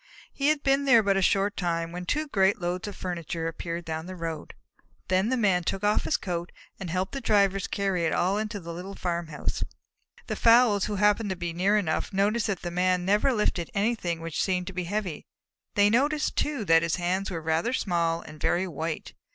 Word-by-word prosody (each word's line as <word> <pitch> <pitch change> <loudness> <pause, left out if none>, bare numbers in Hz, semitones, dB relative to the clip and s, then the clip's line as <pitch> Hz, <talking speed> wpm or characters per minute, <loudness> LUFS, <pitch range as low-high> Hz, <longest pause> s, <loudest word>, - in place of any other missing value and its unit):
He 275 - 0
had 305 -1 +2
been 275 0 +2
there 235 -5 +6
but 200 -1 +2
a 195 - +2
short 195 +2 +2
time 170 -2 -1
when 180 +1 -6
two 305 +6 0
great 195 -6 +2
loads 180 +2 -3
of 205 - -6
furniture 170 -2 -4
appeared 170 +1 -5
down 160 +1 -4
the 185 - -7
road. 165 -3 -5 0.5
Then 185 +4 +2
the 260 - +1
Man 195 -6 +2
took 195 +4 -2
off 210 +1 +2
his - - +1
coat 175 -2 -4 0.3
and 185 - -5
helped 185 +3 -1
the 275 - -5
drivers 200 -4 +2
carry 195 -3 -1
it 160 - +1
all 190 +4 +1
into 215 -1 -3
the 170 -2 -7
little 185 +3 -7
farmhouse. 170 -3 -3 0.6
The - - -3
fowls, 230 -4 +5
who 210 - -3
happened 210 +1 +2
to 190 - -1
be 175 -1 -4
near 195 +5 +2
enough, 160 -7 -1
noticed 210 +3 +1
that 200 -3 -3
the 175 - -3
Man 180 0 +1
never 210 +8 +3
lifted 210 -7 0
anything 200 -6 0
which 165 -1 -3
seemed 180 -2 0
to 190 - -7
be 180 -1 -3
heavy. 185 -4 -3 0.5
They 205 0 +5
noticed, 290 +6 +1
too, 285 -8 -1
that 165 -2 +5
his 170 -1 0
hands 185 +2 -1
were 175 -3 -3
rather 160 +8 0
small 170 -8 0
and 155 0 -12
very 185 +2 +1
white. 160 -1 -4
185 Hz, 210 wpm, -27 LUFS, 170-210 Hz, 0.6 s, there